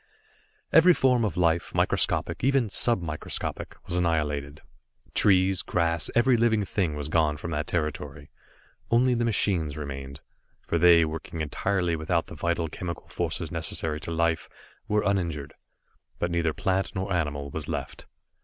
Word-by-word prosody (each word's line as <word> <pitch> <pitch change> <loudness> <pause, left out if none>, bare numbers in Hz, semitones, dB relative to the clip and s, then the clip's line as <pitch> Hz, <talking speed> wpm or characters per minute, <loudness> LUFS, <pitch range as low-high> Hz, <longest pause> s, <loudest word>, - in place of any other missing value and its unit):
Every 170 +3 +7
form 125 -3 +3
of 100 -7 -2
life, 85 -1 +1
microscopic, - - +1
even 135 -4 +2
sub 115 -2 +1
microscopic, 75 -2 -4
was 85 - -4
annihilated. 75 -4 -1 0.5
Trees, 95 -2 +4
grass, 85 -1 0
every 120 +2 +4
living 110 -3 +2
thing 90 -6 -1
was 75 -1 -4
gone 75 -1 +1
from 85 +4 -6
that 75 0 -2
territory. 75 -2 -3 0.6
Only 125 +2 +3
the 120 -1 0
machines 90 -9 +1
remained, 70 -2 -7 0.5
for 85 - 0
they, 85 -1 +6
working 80 +1 -6
entirely 90 +3 -1
without 80 +2 0
the - - -11
vital 85 +1 -1
chemical 85 +2 -7
forces - - -3
necessary 75 -1 -2
to 80 - -7
life, 85 0 0 0.4
were 105 -1 +1
uninjured. 85 -8 -1 0.6
But 85 - -2
neither 85 -1 +1
plant 95 +3 -1
nor 95 0 -2
animal 70 -4 -2
was - - -5
left. - - -5
85 Hz, 145 wpm, -26 LUFS, 75-95 Hz, 0.6 s, Every